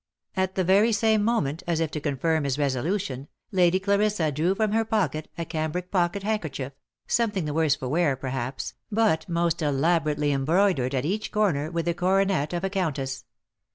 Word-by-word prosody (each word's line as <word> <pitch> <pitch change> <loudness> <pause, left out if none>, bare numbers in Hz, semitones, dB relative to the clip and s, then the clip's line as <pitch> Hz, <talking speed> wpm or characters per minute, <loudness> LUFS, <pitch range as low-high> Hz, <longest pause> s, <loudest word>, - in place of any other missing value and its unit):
At 190 0 0
the 185 - +1
very 200 +6 +4
same 220 0 +2
moment, 170 -10 0
as 170 -2 +1
if 160 -2 -1
to 150 - -3
confirm 150 +2 0
his 140 -1 -1
resolution, 140 +1 -1 0.2
Lady 180 -1 +3
Clarissa 200 -4 +1
drew 165 +7 +1
from 215 0 +1
her 225 +1 +2
pocket 210 -8 -1
a 170 - -3
cambric 165 +2 -3
pocket 180 +1 +1
handkerchief, 160 -11 -3 0.3
something 210 -7 0
the 150 - -3
worse 155 -2 +3
for 130 -3 -6
wear, 150 0 +2
perhaps, 130 0 -4 0.2
but 205 -6 +1
most 170 -1 0
elaborately 150 0 +1
em 135 -1 0
broidered 160 -5 +2
at 130 +1 -1
each 205 +6 -2
corner 170 -9 +1
with 170 -1 -2
the 170 - +1
coronet 185 -3 +1
of 175 +1 -3
a 195 - 0
countess. 145 -9 -2
170 Hz, 180 wpm, -26 LUFS, 145-195 Hz, 0.3 s, very